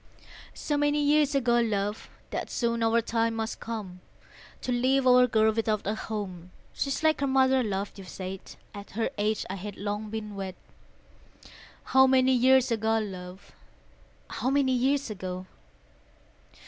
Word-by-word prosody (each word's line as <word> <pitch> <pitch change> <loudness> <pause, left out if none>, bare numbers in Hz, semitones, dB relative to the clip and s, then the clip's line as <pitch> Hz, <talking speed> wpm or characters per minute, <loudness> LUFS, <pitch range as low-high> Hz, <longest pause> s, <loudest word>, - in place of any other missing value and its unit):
So 295 - -2
many 290 0 +2
years 295 0 +3
ago, 240 -3 +3
love, 210 -2 -1 0.2
That - - -3
soon 235 -1 -1
our 225 +1 +3
time 230 0 0
must 225 0 -3
come 205 -6 -6 0.6
To 255 - -3
leave 260 +2 +2
our 250 0 +6
girl 220 -2 +3
without 220 -1 -1
a 205 - 0
home; 195 -5 -6 0.2
She's 275 +2 -2
like 315 -2 +3
her 280 - +1
mother, 265 0 +3
love, 200 -3 -2
you've 195 -3 -11
said: 190 0 -7 0.2
At 200 -1 -9
her 230 - 0
age 215 +1 0
I 195 - -5
had 200 +1 -7
long 205 +1 -4
been 215 -1 -5
wed, 195 -2 -5 1.3
How 265 0 +5
many 260 0 +4
years 260 0 +4
ago, 225 0 +1
love, 190 -3 -7 0.8
How 250 - -2
many 275 -1 +2
years 265 0 +1
ago? 185 -2 -5
225 Hz, 150 wpm, -27 LUFS, 205-260 Hz, 1.3 s, our